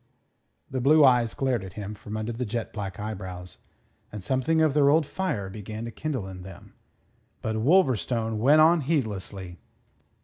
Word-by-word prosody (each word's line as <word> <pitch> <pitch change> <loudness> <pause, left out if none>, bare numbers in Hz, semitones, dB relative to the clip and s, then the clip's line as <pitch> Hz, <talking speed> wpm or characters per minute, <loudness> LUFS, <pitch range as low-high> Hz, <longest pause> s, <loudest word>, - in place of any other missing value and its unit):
The 130 -1 -2
blue 150 +3 +6
eyes 120 -3 +3
glared 130 -6 0
at 95 -2 -9
him 105 0 -6
from 105 +1 -7
under 110 +2 -3
the 120 +2 -4
jet 115 0 -4
black 100 -3 -5
eyebrows, 95 -4 -7 0.5
and 105 -3 -7
something 130 - +1
of 155 -3 +3
their 140 -1 +4
old 155 +2 +4
fire 145 - -3
began 110 +3 -7
to 115 - -6
kindle 135 -6 -4
in 95 -1 -9
them. 90 -1 -12 0.7
But 110 0 -1
Wolverstone 120 - +2
went 145 +7 +5
on 165 +1 +5
heedlessly. 100 - -3
115 Hz, 165 wpm, -26 LUFS, 100-140 Hz, 0.7 s, blue